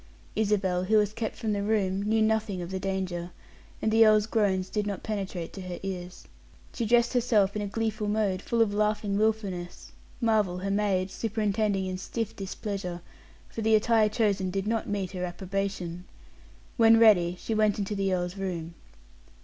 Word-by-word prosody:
Isabel, 195 -4 +1
who 215 +3 +3
was 210 -1 +2
kept 220 -1 -3
from 220 -3 -2
the 200 - -1
room, 200 -2 0
knew 220 +2 +2
nothing 220 -3 0
of 175 - -7
the 190 - -2
danger, 185 -2 -3 0.5
and 220 - +2
the 225 +1 +6
earl's 215 -1 +5
groans 200 -4 +1
did 210 +1 -2
not 200 -2 -4
penetrate 195 -5 -4
to 195 - -7
her 180 -1 -6
ears. 180 -2 -6 0.5
She 230 - -2
dressed 240 +2 +3
herself 220 -5 +2
in 210 - -1
a 205 - -2
gleeful 220 0 -2
mode, 205 -3 0
full 230 +2 +2
of 205 -2 -2
laughing 210 -1 0
willfulness, 205 -5 -2 0.3
Marvel, 215 -6 +2
her 195 +2 -3
maid, 195 -2 +1
superintending 210 -3 0
in 185 0 -4
stiff 225 +3 -4
displeasure, 190 -2 -5 0.5
for 225 - -6
the 220 0 +4
attire 220 0 +3
chosen 205 -4 +1
did 195 +1 -2
not 225 0 -1
meet 200 -3 -2
her 180 -2 -4
approbation. 180 -1 -4 0.7
When 225 -1 +7
ready, 180 -6 +5
she 225 - -3
went 215 -1 +2
into 205 0 -2
the 195 -1 0
earl's 180 0 -1
room. 170 -4 -4
205 Hz, 175 wpm, -28 LUFS, 185-220 Hz, 0.7 s, When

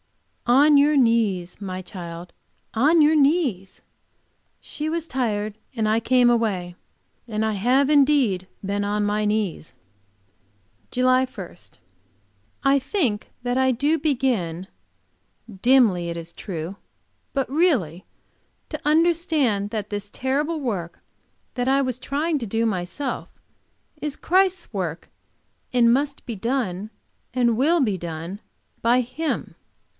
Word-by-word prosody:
"On 285 +4 +6
your 290 +1 +4
knees, 210 -8 +1
my 185 -2 -4
child, 175 -2 -9 0.4
on 300 +8 +4
your 305 +1 +5
knees!" 275 - +1 0.8
She 305 +1 -4
was 330 0 -3
tired, 215 -6 -2 0.2
and 220 -2 0
I 220 +1 +3
came 250 +1 +4
away; 200 -7 0 0.5
and 220 -1 -1
I 220 - 0
have 250 +7 +2
indeed 270 -11 +3 0.2
been 200 +1 -1
on 205 +1 0
my 210 +1 0
knees. 210 -7 -2 1.1
JULY 255 +1 +3
1. 195 -10 -9 1.1
I 275 0 +4
think 260 - -1
that 245 0 0
I 260 0 +3
do 285 +6 +1
begin, 240 - -1 0.9
dimly 225 -10 +4
it 170 - -4
is 170 0 -8
true, 175 +1 -6 0.5
but 270 -3 -1
really, 255 - +1 0.7
to 305 - -5
understand 310 - +2
that 210 -2 -4
this 205 0 -4
terrible 290 +8 -1
work 195 - -4 0.5
which 245 0 -2
I 270 +1 +3
was 255 -3 -2
trying 295 +4 -1
to 230 - -5
do 225 +3 0
myself, 215 +7 -3 0.7
is 300 -1 -3
Christ's 370 -4 +1
work, 175 -5 -4 0.6
and 235 -2 +4
must 280 +2 -1
be 235 - -5
done 215 -3 -2 0.5
and 240 -2 +3
will 310 +8 +3
be 215 -9 +1
done 170 +4 -6 0.4
by 240 +2 +4
Him. 305 +6 -4
235 Hz, 125 wpm, -23 LUFS, 200-280 Hz, 1.1 s, On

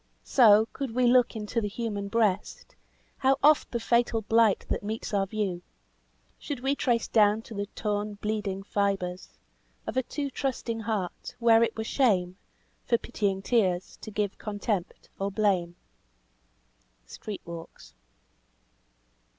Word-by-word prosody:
So, 220 -4 +6
could 265 -5 -4
we 250 0 +3
look 245 0 +4
into 220 +2 -2
the 210 - -1
human 205 -2 -4
breast, 210 -2 -1 0.4
How 270 0 +3
oft 300 +1 +5
the 235 - -2
fatal 235 -1 +1
blight 225 -1 +3
that - - -1
meets 215 +1 -5
our 195 -1 +1
view, 195 -4 -2 0.8
Should 280 -5 -5
we 270 +2 +1
trace 240 -4 0
down 215 0 +3
to 230 - -10
the 200 -1 -3
torn, 210 -1 -2
bleeding 205 -2 -3
fibres 195 -3 -2 0.5
Of - - -4
a - - +4
too 280 +2 -4
trusting 250 -4 -3
heart 210 -5 -4
where 230 -2 +5
it 230 -1 +1
were 220 - -2
shame, 190 -8 +1 0.5
For 235 - +2
pitying 200 -5 -2
tears, 190 -7 +1
to - - -7
give 205 -1 -2
contempt 205 -3 -3
or 195 0 -1
blame." 190 -4 0 1.3
"STREET 205 - -8
WALKS." 165 - -10
215 Hz, 140 wpm, -28 LUFS, 200-235 Hz, 1.3 s, So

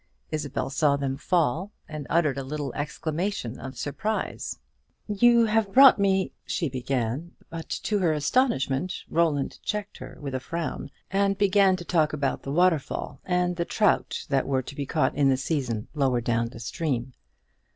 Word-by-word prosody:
Isabel 145 -3 -2
saw 145 0 +3
them 135 -1 -2
fall; 170 +5 0 0.2
and 150 -4 -7
uttered 150 -5 +2
a - - -4
little 140 -1 -4
exclamation 155 - -3
of 130 -1 -8
surprise. 215 +9 -3 0.5
"You 235 +3 +5
have 215 -2 +1
brought 265 -1 +8
me 195 -1 +2
" - - -48
she 165 -5 -2
began; 130 +4 -2 0.2
but 165 -1 -7
to 210 -2 -1
her 175 -4 +2
astonishment 155 - 0
Roland 155 -4 +1
checked 210 -1 -4
her - - -9
with 140 -2 -5
a 130 - -1
frown, 165 +2 -4 0.2
and 195 0 +2
began 200 -1 +4
to 175 -2 -8
talk 155 -4 +2
about 140 -3 -1
the 135 - -5
waterfall, 160 -4 +1
and 180 -1 +1
the 170 - +1
trout 210 +3 +1
that 135 -2 +1
were 135 -1 +1
to 140 - -9
be 140 -1 -4
caught 155 - +1
in 140 -1 +3
the 130 - +3
season 130 -6 -2
lower 135 -5 +2
down 115 0 0
in 120 - -12
the 115 - -9
stream. 125 0 -2
155 Hz, 170 wpm, -26 LUFS, 135-185 Hz, 0.5 s, brought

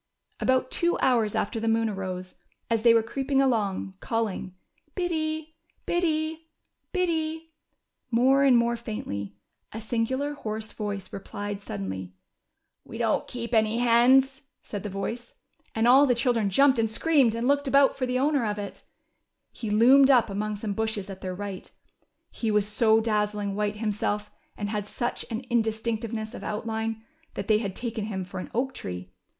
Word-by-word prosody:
About 260 0 +1
two 345 0 +1
hours 230 -5 +2
after 225 +2 -1
the 225 - -2
moon 225 0 +2
arose, 185 -3 -5 0.4
as 225 -1 +2
they 235 0 +6
were 230 -1 +4
creeping 270 +4 -1
along, 210 -8 +1
calling 215 -5 -2 0.4
"Biddy, 315 -3 -2 0.3
Biddy, 320 -2 -1 0.4
Biddy," 325 -3 -1 0.6
more 260 +4 +4
and 265 -3 +6
more 235 0 +2
faintly, 100 - -5 0.4
a 220 - -6
singular, 245 +6 -1
hoarse 220 -5 -5
voice 205 -3 -5
replied 205 +1 -5
suddenly. 95 - -6 0.3
" - - -54
We - - -9
don't - - 0
keep 240 -1 -6
any 220 0 +3
hens," 255 +3 +4 0.2
said 205 - -5
the 210 - -5
voice, 225 +5 -5 0.4
and 225 +1 +2
all 270 +4 +7
the 245 - +3
children 230 -3 +1
jumped 265 +5 +4
and 225 -1 +2
screamed, 255 -1 +3
and 235 +2 -1
looked 285 0 +2
about 275 0 +4
for 255 -2 -2
the 250 0 0
owner 280 0 +2
of 210 -1 -1
it. 200 -1 -7 0.7
He 225 - -6
loomed 260 +6 +6
up 245 -6 +5
among 210 +1 -2
some 205 0 -3
bushes 215 -2 -2
at 190 - -9
their 185 -1 -4
right. 200 -1 -6 0.6
He 225 - -2
was 210 -1 +2
so 220 +1 +3
dazzling 210 -2 0
white 210 +1 -1
him 215 0 -1
self, 210 0 -2 0.3
and 205 -1 -3
had 210 -1 -3
such 240 +3 -3
an 225 0 -3
indistinctness 220 -1 -1
of - - -8
outline, 220 +1 -3 0.3
that 195 - -4
they 215 -1 +4
had 200 -4 -4
taken 225 -3 -3
him 190 -4 -4
for 180 - -7
an - - -6
oak 265 +3 0
tree. 90 0 -6
225 Hz, 165 wpm, -27 LUFS, 210-260 Hz, 0.7 s, all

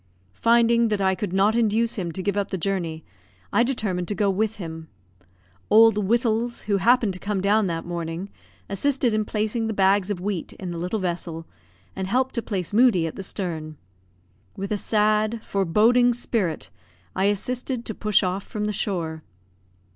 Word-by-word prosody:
Finding 235 - +3
that 210 -2 0
I 190 -1 +2
could 195 0 -4
not 195 +3 +3
induce 230 0 +2
him 175 -5 -3
to 185 - -4
give 200 0 0
up 200 -1 -1
the 190 - -2
journey, 170 -4 -3 0.5
I - - +4
determined 210 -8 -1
to 205 - -2
go 200 -2 +2
with 215 +3 -1
him. 160 -4 -7 0.8
Old 225 0 +7
Wittals, 235 +2 0
who 205 -2 +1
happened 230 0 +3
to 185 - -6
come 205 0 -2
down 205 +2 +2
that 165 -1 -3
morning, 170 +2 -5 0.4
assisted 255 +4 +1
in 215 0 0
placing 220 +2 -1
the 220 - -3
bags 195 0 +3
of 200 -4 -2
wheat 190 -2 -4
in 180 -2 -7
the 170 - -5
little 180 +6 -2
vessel, 170 -3 -3 0.5
and 190 - -3
helped 260 +5 +1
to 235 - -1
place 195 -5 -4
Moodie 220 -7 +4
at 160 - -5
the - - -6
stern. 160 -6 -4 0.8
With 195 +1 -5
a - - +2
sad, 215 +1 +1
foreboding 220 +6 +3
spirit 205 - -2 0.4
I 190 - +1
assisted 240 +4 -1
to 220 - -4
push 210 -1 +2
off 185 +1 -1
from 210 -1 -4
the 210 - -1
shore. 165 -6 -2
205 Hz, 175 wpm, -24 LUFS, 185-225 Hz, 0.8 s, Old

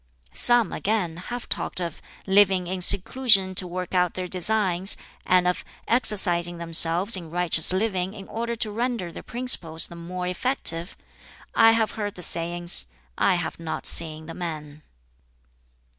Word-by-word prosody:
"Some, 240 -4 +3
again, 190 -6 -2
have 240 +7 -8
talked - - -2
of 170 -3 -6 0.2
'living 190 -2 +3
in 185 +1 -5
seclusion 195 0 +4
to 185 0 +4
work 180 +1 -7
out 180 -2 0
their 185 -1 -5
designs,' 190 0 +1 0.3
and 180 -1 +2
of 180 - -2 0.2
'exercising 175 -7 +3
themselves 170 +4 +3
in 170 -4 -6
righteous 170 -1 +2
living 190 -1 -2
in 195 -2 -11
order 235 +1 -5
to 220 -2 -4
render 230 -5 -4
their - - -10
principles 180 -10 -1
the 170 - -10
more 180 +2 -7
effective'; 180 -4 +1 0.6
I 225 0 +5
have 220 -2 0
heard 205 -2 -6
the 180 - 0
sayings, 170 - 0 0.3
I 190 - +1
have 175 -2 -5
not 165 -1 -6
seen 160 -1 +2
the 165 - -9
men." 155 -4 -8
180 Hz, 150 wpm, -23 LUFS, 170-210 Hz, 0.6 s, I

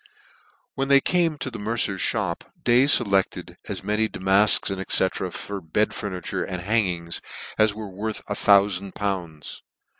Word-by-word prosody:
When 135 0 -2
they 140 0 +6
came 170 0 +1
to 130 - -5
the 115 - -7
mercer's 105 -2 -1
mop, - - -3 0.2
Day 125 +2 +4
felected 100 -9 +3
as - - -5
many 105 +2 0
damafks, 95 +2 +3 0.3
&c. 95 0 +2
for 100 +2 -6
bed 85 +6 -1
furniture 95 -7 -4
and 90 -2 -6
hangings, 90 -5 -1 0.4
as 110 -1 +3
were 105 -2 -7
worth 105 +3 -4
a - - -2
thoufand 100 -1 +2
pounds. 90 -7 -4
100 Hz, 145 wpm, -24 LUFS, 95-110 Hz, 0.4 s, they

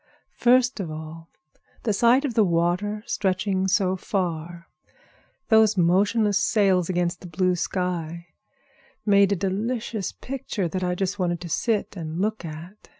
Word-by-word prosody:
"First 245 0 +3
of 180 -5 -3
all, 160 +1 -8 0.5
the 220 - +1
sight 240 +7 +4
of 260 - -2
the 220 - +4
water 180 +4 0
stretching 190 0 0
so 190 -1 +2
far 175 -3 -3 0.2
away, - - -36 0.6
those 220 -2 +5
motionless 200 +4 +3
sails 190 -5 +2
against 175 -1 -1
the 180 - -9
blue 180 +2 +1
sky, 170 -2 -3 0.8
made 200 -1 +4
a - - +3
delicious 210 +3 -2
picture 240 -8 -4
that 185 +3 -3
I 180 0 0
just 195 +2 -2
wanted 175 -2 0
to 175 - -7
sit 215 +4 -1
and 165 -2 -5
look 215 +2 -1
at. 170 +5 -10
190 Hz, 150 wpm, -24 LUFS, 175-210 Hz, 0.8 s, those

